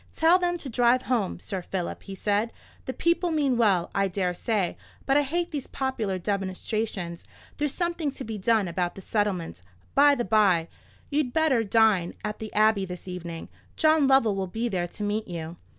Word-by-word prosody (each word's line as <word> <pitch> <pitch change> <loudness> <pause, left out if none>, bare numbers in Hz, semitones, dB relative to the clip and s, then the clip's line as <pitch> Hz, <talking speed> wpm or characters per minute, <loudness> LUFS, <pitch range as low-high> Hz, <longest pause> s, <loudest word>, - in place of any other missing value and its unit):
"Tell 330 +3 +5
them 350 -1 0
to 295 - -8
drive 245 +1 +3
home, 230 -7 -1
Sir 190 -3 -4
Philip," 180 0 -4
he 195 - -8
said. 205 +4 0 0.3
"The - - -2
people 340 +3 +1
mean 290 -5 +1
well, 200 -7 +2
I 195 0 +2
dare 180 -1 -1
say; 195 -1 -1 0.3
but 270 - +2
I 290 - +6
hate 340 +5 -1
these 290 -4 -4
popular 225 -8 -2
demonstrations. 190 -1 -3 0.3
There's 295 -2 -1
something 340 -4 -1
to 270 - -6
be 220 -2 -5
done 215 0 +2
about 175 +1 -2
the 195 - -10
settlements, 190 - -1 0.3
by 285 +1 +6
the 240 - -2
bye; 185 -5 +3 0.4
you'd 285 -4 0
better 310 -8 +3
dine 210 -5 +3
at 210 0 -4
the 220 -1 -6
Abbey 215 -1 +4
this 180 0 -7
evening. 170 -2 -6 0.3
John 310 -3 +4
Lovell 265 -6 +4
will 190 -1 -2
be 225 +6 -2
there 180 -5 -1
to 210 - -7
meet 210 +2 -1
you." 170 -1 -6
215 Hz, 185 wpm, -26 LUFS, 185-270 Hz, 0.4 s, I